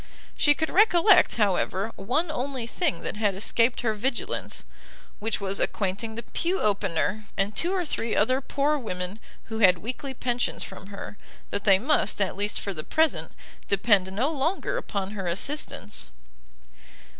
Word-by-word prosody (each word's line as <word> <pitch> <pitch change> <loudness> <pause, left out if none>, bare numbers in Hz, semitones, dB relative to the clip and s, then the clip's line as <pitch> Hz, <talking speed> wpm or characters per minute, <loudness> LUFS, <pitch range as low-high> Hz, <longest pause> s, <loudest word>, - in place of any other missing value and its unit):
She 290 -1 +4
could 315 - -1
recollect, 390 -1 +5
however, 200 0 +1
one 295 - 0
only 260 -3 -3
thing 310 +5 -1
that - - -3
had 205 -3 +1
escaped 230 +4 +1
her 225 -3 +1
vigilance, 265 - -2 0.6
which 225 +1 -1
was 200 -1 -1
acquainting 205 +3 -1
the 235 - -5
pew 355 - -1
opener, 200 0 0
and 200 +1 0
two 345 +9 0
or 370 -2 0
three 230 -6 -2
other 255 +6 +3
poor 290 +2 0
women 185 -3 -4 0.2
who 225 0 -5
had 185 -4 +6
weekly 260 - -5
pensions 245 0 -1
from 195 - -9
her, 200 0 -8 0.3
that 200 - -3
they 195 -2 +7
must, 215 -3 +1
at 195 -2 0
least 205 +1 0
for 200 - -4
the 155 -3 -5
present, 320 - +1 0.4
depend 200 -2 +3
no 245 +10 0
longer 325 - -1
upon 200 - -3
her 195 -4 -4
assistance. 210 - -2
220 Hz, 155 wpm, -26 LUFS, 200-280 Hz, 0.6 s, they